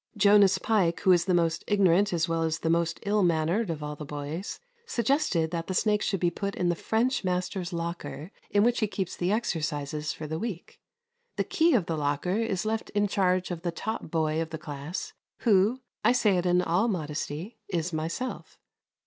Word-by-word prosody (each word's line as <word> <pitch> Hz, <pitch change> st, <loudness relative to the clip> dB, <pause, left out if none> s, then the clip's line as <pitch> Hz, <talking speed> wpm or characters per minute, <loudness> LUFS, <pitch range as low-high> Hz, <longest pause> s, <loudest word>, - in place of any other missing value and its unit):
Jonas 205 Hz, -1 st, +6 dB
Pike, 190 Hz, -7 st, +1 dB
who 190 Hz, -, +5 dB
is 175 Hz, -1 st, +4 dB
the 185 Hz, -, +1 dB
most 165 Hz, -1 st, +1 dB
ignorant 200 Hz, -1 st, +3 dB
as 170 Hz, -1 st, +1 dB
well 165 Hz, 0 st, 0 dB
as 160 Hz, -1 st, 0 dB
the 165 Hz, -, 0 dB
most 170 Hz, 0 st, +1 dB
ill 210 Hz, +1 st, +2 dB
mannered 175 Hz, +4 st, +1 dB
of 155 Hz, -2 st, -3 dB
all 150 Hz, 0 st, -4 dB
the 150 Hz, -, -8 dB
boys, 150 Hz, +6 st, -5 dB, 0.3 s
suggested 235 Hz, -, +1 dB
that 165 Hz, -1 st, -3 dB
the 185 Hz, -, -2 dB
snake 210 Hz, +2 st, +2 dB
should 195 Hz, -, 0 dB
be 175 Hz, 0 st, +2 dB
put 200 Hz, +3 st, -3 dB
into 180 Hz, -, 0 dB
the 175 Hz, -, -2 dB
French 240 Hz, +3 st, +1 dB
master's 180 Hz, 0 st, -2 dB
locker, 170 Hz, 0 st, -5 dB, 0.2 s
in 205 Hz, 0 st, +3 dB
which 240 Hz, +1 st, +2 dB
he 215 Hz, -, +1 dB
keeps 190 Hz, -3 st, -3 dB
the 180 Hz, +2 st, 0 dB
exercises 150 Hz, -7 st, -1 dB
for 155 Hz, -, -7 dB
the 160 Hz, +1 st, -3 dB
week. 205 Hz, -6 st, -6 dB, 0.6 s
The -, -, 0 dB
key 330 Hz, -2 st, +3 dB
of 200 Hz, -8 st, +2 dB
the 165 Hz, -1 st, -2 dB
locker 145 Hz, +6 st, 0 dB
is 205 Hz, -4 st, -1 dB
left 220 Hz, +1 st, -2 dB
in 205 Hz, 0 st, +3 dB
charge 185 Hz, -2 st, +1 dB
of 170 Hz, -2 st, -4 dB
the 175 Hz, -1 st, -2 dB
top 220 Hz, +2 st, -4 dB
boy 160 Hz, -1 st, 0 dB
of 165 Hz, -, -3 dB
the 160 Hz, -, -5 dB
class, 150 Hz, +2 st, -6 dB, 0.3 s
who, 220 Hz, +3 st, +3 dB, 0.2 s
I -, -, +5 dB
say 210 Hz, -6 st, +3 dB
it 180 Hz, 0 st, 0 dB
in 180 Hz, 0 st, +3 dB
all 180 Hz, +7 st, +2 dB
modesty, 160 Hz, +2 st, -4 dB
is 175 Hz, -2 st, -2 dB
myself. 165 Hz, +11 st, -4 dB
180 Hz, 200 wpm, -28 LUFS, 160-205 Hz, 0.6 s, Jonas